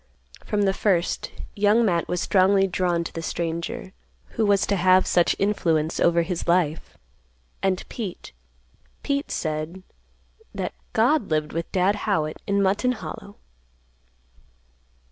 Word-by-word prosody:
From 210 -1 0
the 195 -1 +2
first 185 -4 0 0.2
Young 210 +3 +3
Matt 170 -5 +1
was 180 - -1
strongly 195 +1 +3
drawn 175 -2 0
to - - -7
the 165 - -4
stranger, 170 +6 -4 0.4
who 220 -2 0
was 200 -1 +3
to 200 - 0
have 185 0 +4
such 175 -1 +3
influence 165 -6 0
over 170 0 +3
his 175 +1 -4
life, 170 -3 0 0.6
and 190 -1 -1
Pete—Pete 65 - -7
said 155 +3 -3 0.7
that - - -3 0.2
"God 245 +2 +2
lived 155 -1 -1
with 165 +1 -4
Dad 190 +2 +2
Howitt 155 -6 -1
in 200 0 +2
Mutton 205 +7 +2
Hollow." 210 -3 -8
185 Hz, 125 wpm, -24 LUFS, 165-205 Hz, 0.7 s, have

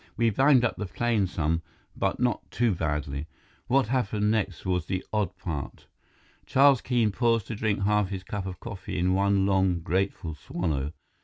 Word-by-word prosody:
We 115 -1 +3
banged 130 +2 +5
up 115 - -1
the 105 - -3
plane 110 0 +1
some, 80 -1 -1 0.3
but - - -1
not 125 -2 0
too 120 -3 +1
badly. 75 -3 -2 0.4
What 130 -3 +2
happened 105 -4 +1
next 100 -5 -1
was 90 -2 0
the 95 -1 -2
odd 100 -4 -1
part." 80 -8 -5 0.6
Charles 135 -1 +5
Keene 120 -4 +1
paused 115 -1 +1
to 115 - -3
drink 105 -2 0
half 105 -1 +2
his 95 -2 -5
cup 100 0 -4
of 90 - -7
coffee 100 -3 -6
in 90 +1 +2
one 100 0 +2
long, 95 -3 +2
grateful 90 -2 -1
swallow. 75 -2 -3
100 Hz, 170 wpm, -27 LUFS, 90-115 Hz, 0.6 s, banged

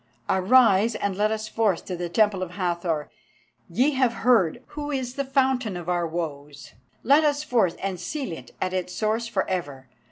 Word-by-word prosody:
Arise, 215 +2 +4
and 200 -2 -2
let 210 +2 +2
us 220 0 -3
forth 215 -5 0
to 185 - -4
the 175 0 -4
Temple 205 0 +2
of 185 - -3
the 180 - -13
Hathor. 170 -5 -2 0.6
Ye 250 - +2
have 260 -4 +2
heard 235 -2 +3
who 295 -1 -5
is 260 -4 -3
the 280 +1 -2
fountain 260 -6 +1
of 175 -1 -8
our 175 -1 0
woes; 150 -4 -6 0.3
let 285 +5 +5
us 295 -1 +1
forth 225 - +1
and 190 -2 -3
seal 270 - -4
it 130 -7 -8
at 185 0 -2
its 180 -1 -3
source 220 +2 0
for 200 -5 -1
ever. 145 -9 -4
200 Hz, 190 wpm, -25 LUFS, 175-250 Hz, 0.6 s, let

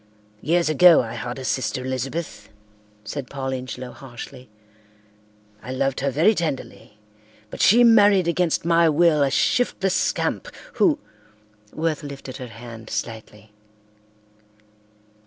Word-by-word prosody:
"Years 170 +1 +1
ago 160 0 +6
I 115 - -7
had 120 +1 -5
a 130 - -7
sister 125 0 -2
Elizabeth," 130 +6 -5 0.5
said 125 +5 -6
Paul 135 -1 -4
Ingelow 130 0 -6
harshly. 130 -1 -11 1.1
"I 125 - -8
loved 135 +1 -1
her 140 - 0
very 160 - +3
tenderly, 145 - -5 0.5
but - - -6
she 235 +5 +6
married 205 -6 +5
against 170 -1 0
my 170 -1 +4
will 155 -1 +3
a 140 - +3
shiftless 190 - +1
scamp - - -1 0.3
who—" 310 -5 +3 0.7
Worth 160 -1 -2
lifted 140 -3 -8
her 125 - -7
hand 115 -1 -11
slightly. 110 -1 -6
140 Hz, 120 wpm, -22 LUFS, 125-170 Hz, 1.1 s, ago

